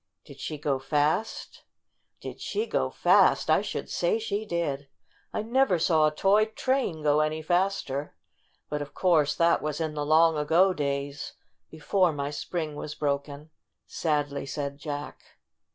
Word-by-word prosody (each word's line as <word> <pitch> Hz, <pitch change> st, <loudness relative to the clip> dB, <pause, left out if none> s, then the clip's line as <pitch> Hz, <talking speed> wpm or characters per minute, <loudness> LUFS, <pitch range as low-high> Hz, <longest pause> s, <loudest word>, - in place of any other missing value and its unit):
"Did -, -, -13 dB
she 155 Hz, -, -4 dB
go 140 Hz, -2 st, -1 dB
fast?" 150 Hz, +9 st, -1 dB, 0.6 s
"Did -, -, -8 dB
she 430 Hz, +2 st, -2 dB
go -, -, -1 dB
fast? -, -, +4 dB
I -, -, +4 dB
should -, -, -4 dB
say -, -, 0 dB
she 220 Hz, -, -3 dB
did! 145 Hz, -6 st, -2 dB, 0.4 s
I -, -, -2 dB
never 235 Hz, -4 st, +2 dB
saw 160 Hz, -2 st, +3 dB
a -, -, 0 dB
toy 195 Hz, +7 st, +3 dB
train 220 Hz, -, -1 dB
go 150 Hz, 0 st, +3 dB
any 155 Hz, +1 st, 0 dB
faster. 175 Hz, -5 st, -1 dB, 0.5 s
But 150 Hz, 0 st, -3 dB
of 145 Hz, -, -8 dB
course 155 Hz, -5 st, +3 dB
that 170 Hz, 0 st, +3 dB
was 150 Hz, 0 st, -3 dB
in 160 Hz, -2 st, -2 dB
the 150 Hz, -1 st, -3 dB
long 160 Hz, +1 st, +4 dB
ago 170 Hz, +6 st, +3 dB
days, 140 Hz, -1 st, -3 dB, 0.4 s
before 175 Hz, +3 st, +1 dB
my 140 Hz, 0 st, -3 dB
spring 155 Hz, +1 st, -4 dB
was 150 Hz, 0 st, -6 dB
broken," 145 Hz, +1 st, -3 dB, 0.3 s
sadly 145 Hz, -3 st, -2 dB
said 140 Hz, 0 st, -4 dB
Jack. 145 Hz, -1 st, -6 dB
155 Hz, 150 wpm, -27 LUFS, 145-180 Hz, 0.6 s, fast